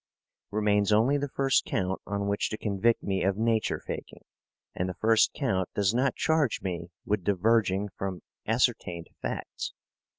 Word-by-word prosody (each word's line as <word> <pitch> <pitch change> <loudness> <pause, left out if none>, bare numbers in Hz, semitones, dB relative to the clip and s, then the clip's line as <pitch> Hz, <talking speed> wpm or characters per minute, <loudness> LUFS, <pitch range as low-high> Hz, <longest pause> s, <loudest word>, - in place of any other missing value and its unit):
Remains 105 0 +2
only 115 +7 +4
the 145 0 -2
first 135 0 +2
count 95 0 -2
on 100 0 -2
which 100 0 0
to 110 - -4
convict 110 +3 +1
me 95 -1 -1
of 95 0 +1
nature 115 0 +1
faking, - - -7 0.5
and 90 +1 -2
the 90 - -5
first 110 0 +4
count 95 -10 0
does 100 +1 +2
not 130 +2 +1
charge 160 -6 +1
me 85 -3 -3 0.2
with 105 -2 0
diverging 100 0 +2
from 95 -2 -4 0.2
ascertained 85 -1 0
facts. - - -4
105 Hz, 155 wpm, -28 LUFS, 95-115 Hz, 0.5 s, only